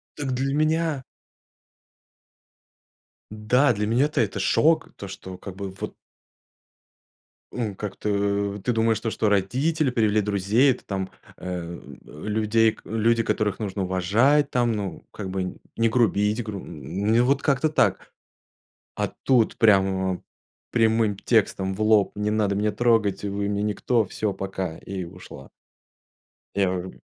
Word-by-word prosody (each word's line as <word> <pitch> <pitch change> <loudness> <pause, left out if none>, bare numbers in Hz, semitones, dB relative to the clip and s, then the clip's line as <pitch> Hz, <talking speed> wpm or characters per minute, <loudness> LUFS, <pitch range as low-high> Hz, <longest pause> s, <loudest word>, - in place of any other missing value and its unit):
Так, 145 -3 -3
для 135 +2 -1
меня 155 -1 +1 2.3
да, 125 +6 +3
для 105 0 -2
меня-то 130 +5 +2
это 100 -2 -1
шок, 150 +12 +2
то, 100 - -8
что, 95 -1 -9
как 95 0 -9
бы, 100 0 -5
вот - - -5 1.6
ну, 110 -5 -3
как-то 100 0 -1
ты 125 - +1
думаешь, 110 0 +2
то, 115 - -3
что 110 - +1
родители 130 - +1
привели 110 -3 +2
друзей, 105 +6 +3
это 125 - -5
там, 95 -1 -3 0.3
э, 85 -1 -5 0.3
э, 75 - -11
людей 110 +1 +2
к - - -16
люди, 115 +1 +2
которых 105 -2 -1
нужно 100 -2 -3
уважать 110 +11 +2
там, 120 -1 +1
ну, 105 -3 -4
как 100 -3 -6
бы, 95 -1 -3 0.2
не 115 0 +3
грубить, 110 -1 +2
гру 105 -3 -5
н 95 - 0
вот 140 +2 +2
как-то 145 +2 +2
так. 150 - +1 0.9
А - - 0
тут 125 -4 +3
прямо 95 -3 +3 0.5
прямым 110 -3 +2
текстом 95 -3 +1
в 100 - -9
лоб: 110 -2 +4
"Не 105 0 -1
надо 105 -2 +1
меня 105 +1 +1
трогать, 110 -3 +2
вы 100 0 -2
мне 100 0 -1
никто, 110 +3 +1
всё, 105 +2 -2
пока". 95 -4 -4
И 95 -1 -5
ушла. 85 -6 -12 1.1
Я, 100 -1 +3
э 90 +1 -5
105 Hz, 140 wpm, -24 LUFS, 95-115 Hz, 2.3 s, лоб